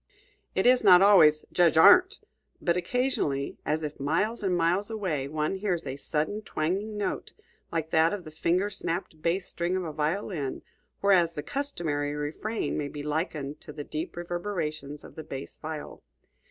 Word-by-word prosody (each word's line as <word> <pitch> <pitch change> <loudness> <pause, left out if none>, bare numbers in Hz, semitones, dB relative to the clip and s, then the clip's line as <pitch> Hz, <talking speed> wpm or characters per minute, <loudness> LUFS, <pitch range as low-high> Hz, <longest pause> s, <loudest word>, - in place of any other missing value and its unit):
It - - +1
is 250 0 +5
not 185 -2 +8
always 155 -7 +6
"Judge 170 -3 +3
Arndt!" 365 - +7 0.4
but 170 - +1
occasionally, 180 - -1
as 155 +1 0
if 150 -1 -5
miles 170 +12 0
and 185 -3 +1
miles 175 +5 +1
away, 185 -11 -2
one 155 +5 -1
hears 185 -5 -2
a 135 -1 -4
sudden 155 +8 -2
twanging 200 +4 -2
note, 205 - -3 0.4
like 160 -1 -2
that 160 +1 +4
of 205 -3 -4
the 155 - -10
finger 180 +6 0
snapped 170 -4 -4
bass 180 +4 0
string 175 +2 -2
of 185 - -1
a 160 -3 -5
violin; 155 -1 -2 0.4
whereas 180 -4 +4
the 150 - -4
customary 155 - -2
refrain 155 +11 -3
may 145 - -2
be 145 0 -7
likened 150 -1 -3
to - - -9
the 150 0 -7
deep 155 +2 -5
reverberations 170 -5 -4
of - - -12
the 160 - -8
bass 135 -2 -7
viol. 155 -1 -7
165 Hz, 165 wpm, -28 LUFS, 150-195 Hz, 0.4 s, not